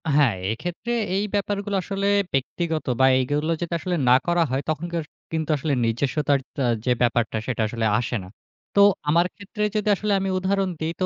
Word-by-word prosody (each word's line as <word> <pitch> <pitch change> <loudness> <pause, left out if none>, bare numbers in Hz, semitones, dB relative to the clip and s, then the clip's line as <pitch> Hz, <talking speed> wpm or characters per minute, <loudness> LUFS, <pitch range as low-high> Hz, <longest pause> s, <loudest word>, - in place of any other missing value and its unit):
হ্যাঁ, 140 -8 +4 0.2
এক্ষেত্রে 175 - -4 0.2
এই 200 - +1
ব্যাপারগুলো 205 0 -1
আসলে 195 +2 -2 0.3
ব্যক্তিগত 160 +4 -1
বা 130 - +6
এগুলো 145 +5 0
যদি 170 0 -3
আসলে 180 +3 -2
না 125 - +8
করা 175 0 +3
হয় 135 +1 0
তখন 155 +2 -1
কে - - 0 0.3
কিন্তু 160 -1 -2
আসলে 145 +1 -1
নিজস্বতার 140 +5 +1 0.2
আ - - +2 0.2
যে 125 - +2
ব্যাপারটা 120 -2 +1
সেটা 125 -3 -1
আসলে 115 +1 -2
আসে 120 0 -2
না। - - -10 0.5
তো 200 - +6 0.3
আমার 170 +3 +4
ক্ষেত্রে 210 +1 -5
যদি 215 0 0
আসলে 210 +2 -2
আমি 195 0 -1
উদাহরণ 190 +1 0
দেই, 160 +1 -2
তো - - +3
160 Hz, 185 wpm, -24 LUFS, 130-195 Hz, 0.5 s, না